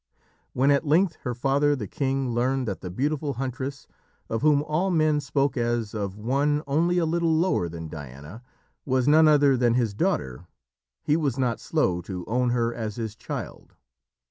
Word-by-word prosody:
When 135 +3 +3
at 140 - +3
length 165 +3 +2
her 125 -1 -3
father 140 +4 +2
the 120 -6 -5
king 135 +1 -1
learned 130 +2 0
that 100 - -4
the 90 - -6
beautiful 145 - -1
huntress, 135 +2 -5 0.4
of 115 - -1
whom 145 -1 +4
all 155 +5 0
men 155 -4 +2
spoke 140 -2 0
as 120 -3 -1
of 100 -2 -4
one 140 +7 0
only 165 +5 +1
a 170 - +2
little 165 0 +1
lower 160 - +1
than 80 -1 -7
Diana, 75 - -9 0.4
was 130 -1 0
none 155 +1 +6
other 145 -3 +5
than 120 -2 +2
his 115 -4 +1
daughter, 65 -4 -2 0.6
he 150 - +2
was 145 -6 0
not 125 -3 0
slow 95 - 0
to 90 0 -6
own 125 +3 0
her 120 -1 0
as 110 -3 -4
his 110 -2 -5
child. 110 - -7
130 Hz, 175 wpm, -25 LUFS, 115-150 Hz, 0.6 s, none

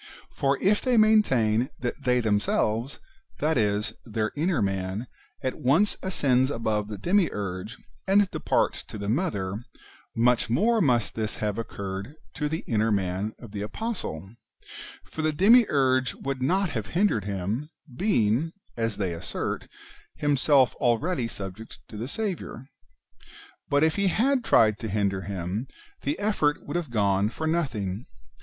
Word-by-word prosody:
For 140 0 +1
if 205 +2 +3
they 255 -2 +2
maintain 130 - +4
that 125 +3 -4
they 125 -1 +3
themselves, 110 +3 0 0.4
that 155 +2 +1
is, 105 -3 +1
their 110 -2 -2
[inner] 165 +4 +1
man, 95 +2 -1 0.4
at 130 - -2
once 160 +12 +3
ascends 135 -8 +2
above 110 -5 -1
the 105 -1 -6
Demiurge, 105 - -1 0.3
and 200 +1 +5
departs - - 0
to - - -8
the 100 -1 -5
Mother, 105 - -1 0.5
much 120 +1 +3
more 220 - +3
must 120 - +2
this 110 -1 -3
have 105 0 -2
occurred 100 +2 -5 0.2
to 150 -1 -2
the 160 +2 -2
[inner] 110 0 +1
man 100 +1 -1
of 115 -4 -12
the 100 -1 -5
apostle; 105 - -4 0.7
for 160 - -6
the 155 0 +2
Demiurge 145 - +4
would 135 -1 -4
not 185 +6 +1
have 110 -5 -3
hindered 180 - +2
him, 100 +9 -3 0.3
being, 145 - +1 0.2
as 115 -3 -1
they 95 -4 -1
assert, 85 - -4 0.5
himself 140 -2 +3
already 125 +3 +1
subject 100 +1 -8
to - - -10
the 110 +4 -4
Saviour. 185 - -4 1.0
But 145 +1 +3
if 160 +3 +2
he 200 0 +2
had 250 +7 +2
tried 110 - +4
to 110 - -4
hinder 100 -2 0
him, 95 +5 -4 0.3
the 295 - -1
effort 200 -8 0
would 145 - -5
have 175 -5 -1
gone 100 -3 +2
for 160 - -5
nothing. 120 - -1
120 Hz, 145 wpm, -26 LUFS, 105-160 Hz, 1.0 s, and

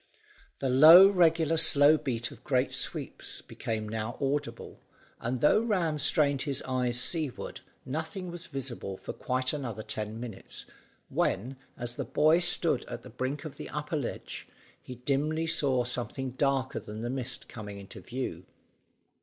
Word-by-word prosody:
The 135 - -1
low, 160 +8 +10
regular, 165 -4 +3
slow 150 -1 +6
beat 120 -6 -3
of - - -14
great - - +1
sweeps - - -2
became 110 -1 -4
now 110 +2 -3
audible, 140 +1 -3 0.4
but 120 +1 -2
though 150 - +5
Ram 180 -9 0
strained 140 -1 +3
his 140 -3 -3
eyes 125 -2 0
seaward, 155 -3 -2 0.2
nothing 160 +6 -4
was 175 0 -6
visible 130 -9 -5
for - - -7
quite 130 +1 -1
another 120 -7 -4
ten 110 +1 -4
minutes, 115 -5 -7 0.4
when, 125 +8 0 0.2
as 120 0 -4
the 140 - -1
boy 150 +6 +4
stood 175 - +2
at - - -7
the - - -11
brink 140 +4 -3
of 155 - -7
the - - -7
upper 150 +2 -3
ledge 140 -5 -4 0.3
he 125 - -9
dimly 145 +6 0
saw 140 -6 +2
something 125 +2 -3
darker 135 0 0
than 105 +1 -8
the 120 - -3
mist 130 -1 -4
coming 105 -3 -8
into 100 -1 -10
view. 130 +2 -5
135 Hz, 155 wpm, -29 LUFS, 120-155 Hz, 0.4 s, low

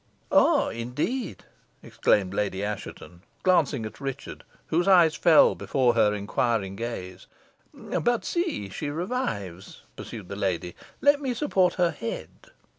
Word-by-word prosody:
"Ah, - - +4
indeed!" 150 - -4 0.4
exclaimed 95 -2 +1
Lady 100 -1 -1
Assheton, 100 -4 -6 0.2
glancing 155 -10 +2
at 110 - -9
Richard, 135 0 -6 0.2
whose 175 +3 0
eyes 175 -5 +6
fell 165 -1 +5
before 125 -3 +1
her 110 -3 +3
inquiring 100 -1 -1
gaze. 95 -5 -6 0.4
"But 240 -1 -1
see, 340 - -2
she 145 +9 -4
revives," 145 - -4
pursued 105 -6 -8
the 100 - -6
lady. 90 -3 -2 0.3
"Let 285 +1 +4
me 260 -3 -2
support 195 -10 +1
her 175 -2 +2
head." 115 -7 -6
125 Hz, 125 wpm, -26 LUFS, -, 0.4 s, eyes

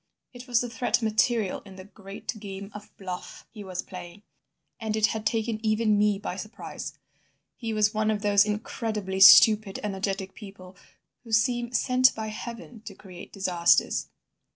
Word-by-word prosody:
It 245 +1 -11
was 240 -2 +2
the 245 - -4
threat 240 0 0
material 220 -1 +1
in 195 -2 -13
the 185 - -10
great 200 +1 -8
game 200 0 -8
of 210 0 -10
bluff 185 -2 -8
he 210 -2 -10
was 185 -1 -5
playing, 180 +1 -10 0.6
and 220 -1 -2
it 220 -1 +3
had 220 -1 -1
taken 225 -1 -2
even 215 0 +2
me 205 0 +2
by 195 -2 -5
surprise. 215 +4 -8 0.6
He 230 -2 -5
was 215 0 +2
one 215 0 0
of 210 -1 -1
those 200 -1 +5
incredibly 210 -2 -3
stupid 210 +1 +7
energetic 195 -1 -3
people 195 -3 -12 0.5
who 230 - -12
seem 240 +2 +1
sent 255 +1 +3
by 220 -1 -4
heaven 235 +1 -8
to 200 - -9
create 185 -3 -12
disasters. 180 -3 +2
210 Hz, 160 wpm, -26 LUFS, 195-225 Hz, 0.6 s, stupid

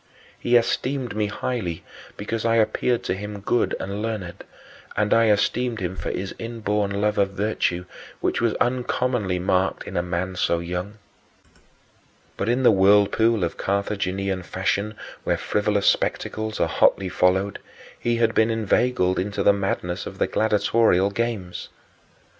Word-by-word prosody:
He 120 - +2
esteemed 125 0 +1
me 105 -1 0
highly 100 -6 -3 0.3
because 110 +2 -3
I 115 0 +2
appeared 115 +2 +1
to - - -1
him 105 +2 -6
good 115 +4 +1
and 100 +2 -4
learned, 105 -6 -4 0.5
and 105 0 +2
I 115 -1 +4
esteemed 115 +3 +1
him 90 -1 -3
for - - -4
his 95 +1 -4
inborn 105 -3 -2
love 105 0 +1
of 100 -1 +1
virtue, 95 -3 -1 0.3
which - - 0
was 115 -2 +1
uncommonly 125 -5 0
marked 95 +1 0
in - - -8
a 85 - +2
man 90 +1 -3
so 85 -1 +1
young. 90 +5 -4 1.4
But 100 - -2
in 125 +2 +1
the 120 - +7
whirlpool 105 +2 +4
of 85 - -2
Carthaginian 100 -1 -1
fashion 100 +4 -2 0.3
where - - +1
frivolous 105 -1 0
spectacles 110 0 0
are - - +2
hotly 95 - +3
followed 95 +3 +1 0.4
he 120 0 0
had 115 -1 +2
been 110 +1 +3
inveigled 110 -3 +1
into 100 +2 -2
the 100 - +6
madness 95 -3 -2
of - - -8
the - - +2
gladiatorial 105 -2 +2
games. 105 -5 -3
105 Hz, 145 wpm, -23 LUFS, 95-115 Hz, 1.4 s, the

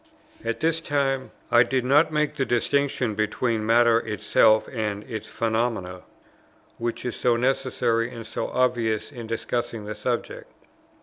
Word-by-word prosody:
At - - -3
this 165 0 +1
time 135 -4 0 0.2
I 120 - +7
did 125 +1 +1
not 145 +5 +4
make 150 -1 0
the 135 - 0
distinction 130 -1 0
between 110 +2 -1
matter 115 0 +5
itself 110 0 +3
and 105 -3 -2
its 110 -3 -7
phenomena, 110 -5 -1 0.8
which 120 +1 -3
is 125 - -3
so 120 -1 +2
necessary 120 -2 0
and 115 -2 -8
so - - -3
obvious 115 -3 0
in 120 -5 -8
discussing 115 -1 -3
the 105 - -4
subject. 120 +3 -4
120 Hz, 140 wpm, -25 LUFS, 110-130 Hz, 0.8 s, I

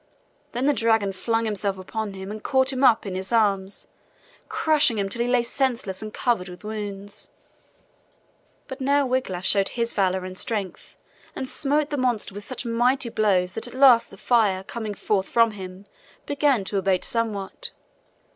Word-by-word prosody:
Then 245 +3 -1
the 290 - +4
dragon 225 -5 +2
flung 225 +4 -1
himself 200 -2 -1
upon 205 +2 -5
him 190 +1 -7
and 215 0 -7
caught 265 +1 +2
him 260 +1 -1
up 230 -5 +5
in 195 - -4
his 190 +3 -4
arms, 200 -4 +1 0.6
crushing 300 -7 +3
him 200 -1 0
till 235 +4 0
he 240 - +1
lay 245 -1 +3
senseless 235 -6 -2
and 215 0 -6
covered 205 -6 0
with 180 +2 -11
wounds. 205 -2 -6 1.4
But 265 +1 -8
now 280 +1 +3
Wiglaf 250 -8 -2
showed 195 -1 +3
his 235 -1 -2
valor 190 -2 +1
and 185 0 -7
strength, 200 -4 -4 0.4
and 260 - -4
smote 295 +3 0
the 290 - -1
monster 245 -6 0
with 205 +1 -8
such 255 -1 -4
mighty 240 +2 +1
blows 190 -5 +1
that 225 - -2
at 245 - -9
last 255 -3 +6
the 195 - -13
fire 210 -4 +2
coming 215 0 -5
forth 195 -1 0
from 230 -1 +4
him 190 -1 -9 0.4
began 280 -6 +2
to 195 +1 -1
abate 190 -1 +1
somewhat. 230 - -2
220 Hz, 175 wpm, -24 LUFS, 195-250 Hz, 1.4 s, last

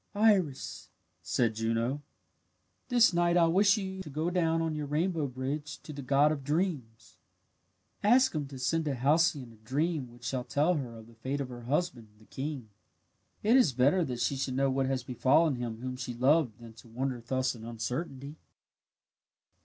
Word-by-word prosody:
"Iris," 200 -10 +1 0.3
said 115 -2 +1
Juno, 115 +5 -1 0.9
"this 240 -6 +5
night 175 0 +3
I 170 - +6
wish 195 +5 +4
you 190 -2 -4
to 180 - -8
go 155 +5 -2
down 165 -2 +1
on 165 -1 -1
your 150 -1 -4
rainbow 160 +1 0
bridge 140 +3 -4
to 155 - -8
the 140 - -6
god 140 +3 +3
of 145 -3 -3
dreams. 145 -7 -3 0.8
"Ask 250 +5 +4
him 150 -3 -2
to 135 -1 -9
send 155 +6 0
to 145 -3 -1
Halcyone 140 -2 +2
a - - -19
dream 135 +4 -2
which 120 0 -17
shall 125 0 -2
tell 150 +7 +1
her 125 -8 -4
of 110 - -12
the 115 - -17
fate 130 +5 -4
of 135 -2 -3
her 120 -1 -9
husband, 130 -4 -1
the 110 - -20
king. 135 -4 -5 0.7
It 220 +4 +4
is 250 - +5
better 140 +9 +3
that 125 -4 -4
she 140 - +1
should 130 -1 -2
know 135 0 +2
what 135 0 0
has 130 -1 -1
befallen 130 +4 +2
him 115 -2 -5
whom 130 0 -4
she 125 -1 -5
loved 130 -2 +2
than 115 -1 -12
to 110 +1 -16
wander 125 +1 -3
thus 130 +2 -1
in 115 -2 -11
uncertainty." 130 +5 -5
135 Hz, 185 wpm, -30 LUFS, 125-165 Hz, 0.9 s, I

